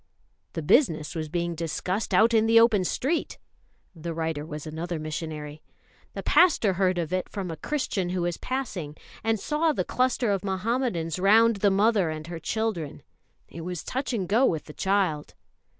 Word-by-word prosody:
"The 165 - -4
business 155 - +3
was 155 -2 -4
being 170 +1 -1
discussed 170 +5 -3
out 230 +2 +5
in 220 0 +4
the 230 0 +7
open 220 -4 +4
street" 295 - -1 0.6
the 165 0 -5
writer 160 -2 -2
was 150 -1 -7
another 165 +2 -4
missionary 155 -1 -5 0.5
"the - - -6
pastor 305 - +4
heard 185 0 +1
of 170 0 -2
it 185 -1 -1
from 190 -4 -4
a - - -4
Christian 200 - -2
who 180 -1 -1
was 175 -1 -1
passing, 205 - -4 0.3
and 225 -1 +1
saw 310 +7 +1
the - - -1
cluster 250 -3 +1
of 195 -2 -1
Muhammadans 190 - -1
round 220 +3 +5
the 200 +1 +3
mother 200 -2 +3
and 155 0 -5
her 170 0 -6
children. 200 -6 -3 0.4
It 165 - -9
was 180 0 -5
touch 265 +2 -3
and 200 -7 -2
go 225 +7 +3
with 160 - +2
the 150 - -11
child." 190 -6 0
185 Hz, 175 wpm, -26 LUFS, 160-225 Hz, 0.6 s, the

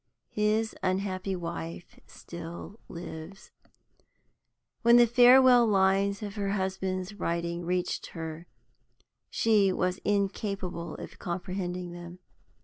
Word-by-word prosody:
His 215 +1 +1
unhappy 185 0 -1
wife 170 -1 -7
still 170 +5 -9
lives. 170 +2 -9 1.3
When 235 0 +6
the 240 - +8
farewell 245 0 +7
lines 195 +1 +2
of 205 -1 -5
her 200 -1 -2
husband's 190 0 -2
writing 170 -3 -3
reached 180 0 -1
her 160 0 -7 0.8
she 210 -4 +3
was 185 0 -1
incapable 195 -4 -2
of - - -10
comprehending 180 0 -4
them. 175 0 -9
190 Hz, 100 wpm, -28 LUFS, 175-205 Hz, 1.3 s, the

